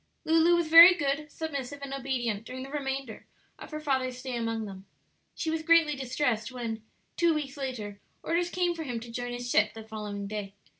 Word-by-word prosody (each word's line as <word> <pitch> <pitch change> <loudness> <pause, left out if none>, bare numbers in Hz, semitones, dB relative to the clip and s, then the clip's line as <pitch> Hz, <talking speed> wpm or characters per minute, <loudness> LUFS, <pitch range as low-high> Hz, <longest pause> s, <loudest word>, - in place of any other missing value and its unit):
Lulu 325 +2 +5
was 340 -2 +1
very 335 +3 +10
good, 295 -2 -2
submissive, 285 -4 -5
and 275 -1 -5
obedient 245 -6 -2
during 255 +2 -7
the 270 - -9
remainder 270 -5 -4 0.3
of - - -10
her 305 - -5
father's 260 -4 -1
stay 255 -1 -5
among 225 -1 -2
them. 195 -1 -10 0.5
She 320 - -2
was 320 0 -1
greatly 320 -2 +4
distressed 255 -3 -1
when, 230 -3 -4 0.4
two 340 -2 +3
weeks 280 -3 -4
later, 235 -8 -5 0.2
orders 345 +1 0
came 355 -1 0
for 330 - -7
him 250 -7 -3
to 235 +1 -10
join 245 +1 -4
his 245 0 -5
ship 210 +1 +3
the 225 - -8
following 210 -2 -6
day. 200 -1 -5
265 Hz, 195 wpm, -29 LUFS, 225-305 Hz, 0.5 s, very